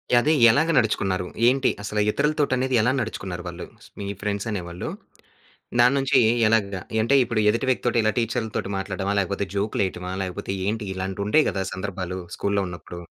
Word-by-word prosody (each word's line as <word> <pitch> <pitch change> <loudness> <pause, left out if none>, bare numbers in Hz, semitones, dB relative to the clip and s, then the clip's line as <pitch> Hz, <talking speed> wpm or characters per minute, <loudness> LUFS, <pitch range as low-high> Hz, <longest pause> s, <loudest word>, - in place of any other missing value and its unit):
యదె 140 +6 +4 0.2
ఎలాగ 155 +8 +3
నడుచుకున్నారు? 95 -5 +1 0.2
ఏంటి 135 +2 +3
అసల 105 0 -3
ఇతరులతోటనేది 130 -2 +1
ఎలా 120 +4 +3
నడుచుకున్నారు 95 -6 -4
వాళ్ళు? 85 0 -6 0.3
మీ 100 - -4
ఫ్రెండ్సనే 100 0 -2
వాళ్ళు. 85 +1 -5 0.9
దాన్నుంచి 135 +2 +4 0.3
ఎలాగా 100 -4 +1 0.2
యంటే, 115 +5 +3
ఇప్పుడు 115 -2 -1
ఎదుటి 115 +4 -1
వ్యక్తోటి 120 -1 0
ఇలా 110 - +3
టీచర్లతోటి 110 -3 -2
మాట్లాడ్డమా? 95 +1 -2
లేకపోతే 100 +1 -2
జోకులేయటమా? 95 -3 -1
లేకపోతే 95 +1 -4
ఏంటి? 110 0 -2
ఇలాంటియుంటయి 100 +8 +1
కదా! 95 -1 -2
సందర్భాలు 95 -1 -4 0.2
స్కూల్‌లో 100 -1 0
ఉన్నప్పుడు. 85 0 -9
105 Hz, 135 wpm, -24 LUFS, 95-120 Hz, 0.9 s, యదె